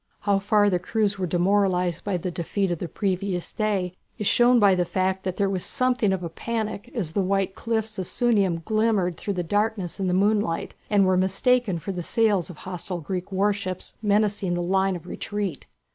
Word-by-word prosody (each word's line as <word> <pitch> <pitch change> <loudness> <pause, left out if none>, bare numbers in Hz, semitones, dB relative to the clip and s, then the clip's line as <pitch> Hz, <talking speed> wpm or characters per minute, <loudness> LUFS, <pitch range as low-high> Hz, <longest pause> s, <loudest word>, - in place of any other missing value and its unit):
How 200 -1 +2
far 205 +1 +3
the 180 -3 +2
crews 205 +1 0
were 185 - -1
demoralized 180 -1 +1
by 200 -3 -1
the 180 +1 -4
defeat 180 +3 -1
of 170 - -2
the 175 - -3
previous 185 -1 -2
day 200 -5 -1 0.2
is 210 - -3
shown 240 +3 +5
by 200 -3 +6
the 180 -1 +2
fact 185 +2 -1
that 185 -1 -3
there 200 - +2
was 190 -2 -2
something 250 -5 +1
of 190 -2 -1
a - - -2
panic 220 +3 -4
as 185 -10 -2
the 200 - 0
white 195 0 0
cliffs 220 -2 -2
of 185 - -3
Sunium 200 -9 +1
glimmered 215 -5 +1
through 200 +3 -4
the 180 - -1
darkness 205 0 -1
in 190 - 0
the 180 - +1
moonlight 205 -3 +1 0.2
and 205 -2 +4
were 185 0 +3
mistaken 195 +2 +2
for 165 +4 -5
the 180 -2 -4
sails 205 -1 +1
of 175 - -10
hostile 180 -1 -5
Greek 180 +4 -5
warships 195 -1 -1
menacing 205 -3 +1
the 175 - -1
line 190 +1 +1
of 175 - -8
retreat. 200 -3 -4
195 Hz, 200 wpm, -25 LUFS, 180-210 Hz, 0.2 s, by